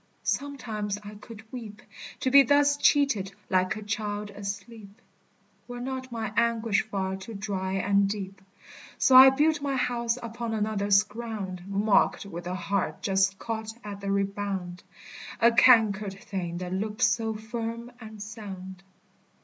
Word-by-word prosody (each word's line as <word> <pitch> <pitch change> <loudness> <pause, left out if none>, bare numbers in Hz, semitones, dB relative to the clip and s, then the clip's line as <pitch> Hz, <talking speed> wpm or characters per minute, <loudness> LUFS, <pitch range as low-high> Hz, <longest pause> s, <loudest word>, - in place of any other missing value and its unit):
Sometimes 225 -8 -2
I 205 +1 -9
could 220 +1 -12
weep 220 -5 -8 0.4
To 260 - 0
be 280 +1 +9
thus 285 +1 +4
cheated, 275 -10 +2 0.2
like 185 0 +2
a 215 - -7
child 210 0 -3
asleep; 205 +1 -8 0.7
Were 245 0 -7
not 260 0 -5
my 220 -2 -4
anguish 230 -3 +2
far 195 -3 -3
too 195 +4 -9
dry 195 -2 -3
and 200 +1 +2
deep. 195 -2 -5 0.6
So 260 - +4
I 260 +1 +11
built 295 +3 +2
my 280 -1 -1
house 235 -2 0
upon 230 0 -4
another's 205 -1 +2
ground; 215 -4 -6
Mocked 200 +1 +2
with 175 -3 -7
a 180 - -3
heart 185 -3 -2
just 195 0 +2
caught 220 0 -5
at 200 -1 -7
the 200 0 -2
rebound, 195 -2 -2 0.6
A 235 - +6
cankered 215 -5 +4
thing 175 -4 -5
that 180 0 -5
looked 210 +3 -2
so 225 -1 +2
firm 230 +2 -5
and 215 -2 -9
sound. 190 -4 -9
210 Hz, 145 wpm, -27 LUFS, 195-235 Hz, 0.7 s, I